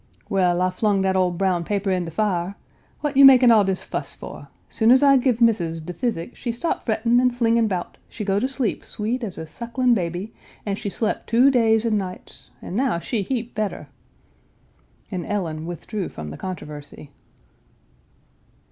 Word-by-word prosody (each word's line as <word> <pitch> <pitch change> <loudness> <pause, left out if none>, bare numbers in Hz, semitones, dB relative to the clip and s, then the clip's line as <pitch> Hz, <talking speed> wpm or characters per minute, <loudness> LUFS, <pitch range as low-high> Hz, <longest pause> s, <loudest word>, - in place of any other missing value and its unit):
"Well, 180 -2 +2
I 185 - +1
flung 200 +1 +1
dat 190 0 +1
ole 185 -1 +3
brown 180 0 0
paper 200 +1 -1
in 180 -2 0
de - - -5
fire. 185 0 -1 0.5
What 295 -2 -2
you 275 - +7
makin' 255 -3 +8
all 215 -2 +6
dis 190 -1 -1
fuss - - -5
for? - - -10 0.2
Soon 225 0 +1
as 260 +3 +6
I 275 -1 +6
give 250 -2 +1
Missis 175 -8 +2
de 170 +3 -7
physic, 225 0 -3
she 240 - -3
stop 280 +9 -2
frettin' 230 +1 +2
an' 250 0 +4
flingin' 230 -2 +2
'bout, 185 -4 -4
she 210 - -6
go 195 0 +1
to 255 - 0
sleep 265 -4 -2
sweet 235 +4 -3
as 200 -5 -5
a 160 - -5
suckling 235 +8 0
baby, 180 +1 -3 0.3
an' 200 -2 -1
she 200 - -4
slep 215 +2 -2
two 250 +5 +5
days 225 -3 +3
an' 215 -2 +2
nights, 185 -2 -9
an' 180 - -6
now 250 -5 +1
she 205 +6 -2
heap 235 +3 -3
better." 215 -2 -3 1.2
And 180 -3 -3
Ellen 165 -5 -3
withdrew 180 +3 -5
from 75 -1 -8
the 75 - -8
controversy. 150 -5 -8
210 Hz, 185 wpm, -23 LUFS, 180-235 Hz, 1.2 s, makin